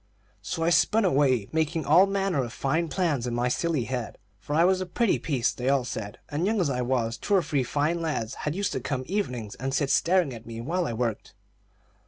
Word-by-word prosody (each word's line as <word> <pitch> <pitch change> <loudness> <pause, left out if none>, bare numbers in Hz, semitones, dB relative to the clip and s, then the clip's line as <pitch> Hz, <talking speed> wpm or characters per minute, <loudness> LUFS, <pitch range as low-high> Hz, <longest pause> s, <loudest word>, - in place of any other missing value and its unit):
So 165 - -3
I 170 - +2
spun 210 +6 +3
away, 135 - +2
making 160 0 0
all 175 +7 +6
manner 195 -7 0
of 120 - -6
fine 160 +7 0
plans 155 -8 0
in 120 - -2
my 120 +1 +1
silly 155 0 0
head, 120 0 -4 0.2
for 145 +9 -4
I 165 - +5
was 185 +1 +3
a 185 - -3
pretty 230 +4 +1
piece, 135 -7 0
they 125 +1 -2
all 135 -3 +2
said, 105 -3 -5
and 145 +3 -2
young 220 0 +1
as 165 -7 +1
I 125 -1 -1
was, 120 -2 0
two 205 - +1
or 185 - +3
three 145 -2 0
fine 150 +6 0
lads 150 -9 -2 0.2
used 195 +5 -1
to - - -2
come 135 -3 -3
evenings 125 - -3
and 135 +2 -3
sit 140 0 +1
staring 175 -5 +3
at 115 -1 -10
me 115 -1 -7
while 170 +8 -1
I 120 - -3
worked. 115 -1 -3
145 Hz, 225 wpm, -26 LUFS, 125-170 Hz, 0.2 s, all